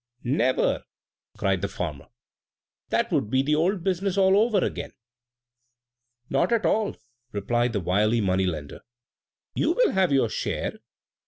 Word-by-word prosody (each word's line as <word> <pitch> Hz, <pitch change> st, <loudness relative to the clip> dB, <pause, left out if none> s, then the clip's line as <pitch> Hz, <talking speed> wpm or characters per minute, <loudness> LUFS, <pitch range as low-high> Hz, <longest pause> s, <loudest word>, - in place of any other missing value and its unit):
"Never!" 130 Hz, 0 st, +1 dB, 0.6 s
cried 95 Hz, -2 st, 0 dB
the 100 Hz, -, 0 dB
farmer; 85 Hz, -7 st, -5 dB, 0.8 s
"that -, -, 0 dB
would 105 Hz, -, 0 dB
be 130 Hz, +3 st, +2 dB
the 150 Hz, +2 st, +1 dB
old 175 Hz, +4 st, +1 dB
business 190 Hz, +1 st, -1 dB
all 190 Hz, 0 st, +5 dB
over 215 Hz, +1 st, +3 dB
again!" -, -, -5 dB, 1.3 s
"Not 140 Hz, +10 st, +1 dB
at 230 Hz, -2 st, +2 dB
all!" 215 Hz, -1 st, +1 dB, 0.4 s
replied 120 Hz, +4 st, 0 dB
the 100 Hz, -, -1 dB
wily 105 Hz, +6 st, +2 dB
money 95 Hz, -2 st, +1 dB
lender; 75 Hz, -5 st, -5 dB, 0.7 s
"you -, -, +1 dB
will -, -, +3 dB
have 190 Hz, -3 st, +2 dB
your 135 Hz, -4 st, +3 dB
share! -, -, -3 dB
130 Hz, 140 wpm, -25 LUFS, -, 1.3 s, all